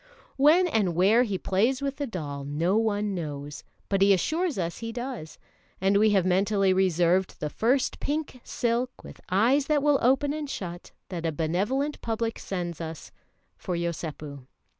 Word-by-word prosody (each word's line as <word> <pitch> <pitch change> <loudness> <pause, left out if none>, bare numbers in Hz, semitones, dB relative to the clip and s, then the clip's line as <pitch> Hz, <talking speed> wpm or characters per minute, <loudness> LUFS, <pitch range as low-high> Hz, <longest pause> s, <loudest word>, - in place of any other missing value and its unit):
When 310 +7 +5
and 210 - +1
where 200 +7 +5
he 205 -6 0
plays 225 +9 +1
with 275 -1 -3
the 285 - -2
doll 145 - -5
no 160 +7 0
one 210 -2 +1
knows, 145 -4 -5 0.2
but 195 -1 0
he 200 0 +6
assures 315 - 0
us 170 -2 -3
he 230 0 -5
does; 240 - -6 0.4
and 195 +1 +2
we 215 +1 +5
have 195 -3 +3
mentally 195 +1 +2
reserved 185 0 +2
the 150 - -3
first 250 +4 +1
pink 290 -4 -3
silk, 245 +1 -2
with - - -12
eyes 245 +9 +3
that 295 -2 +2
will 290 -2 +4
open 270 +4 +3
and 300 -2 -4
shut, 175 -7 -6 0.2
that 170 -3 -3
a - - 0
benevolent 200 - -1
public 225 0 -2
sends 175 -4 -4
to 165 - -3
us, 160 -2 -9 0.5
for 180 - -4
Yosépu. 155 -5 -5
200 Hz, 170 wpm, -27 LUFS, 170-255 Hz, 0.5 s, he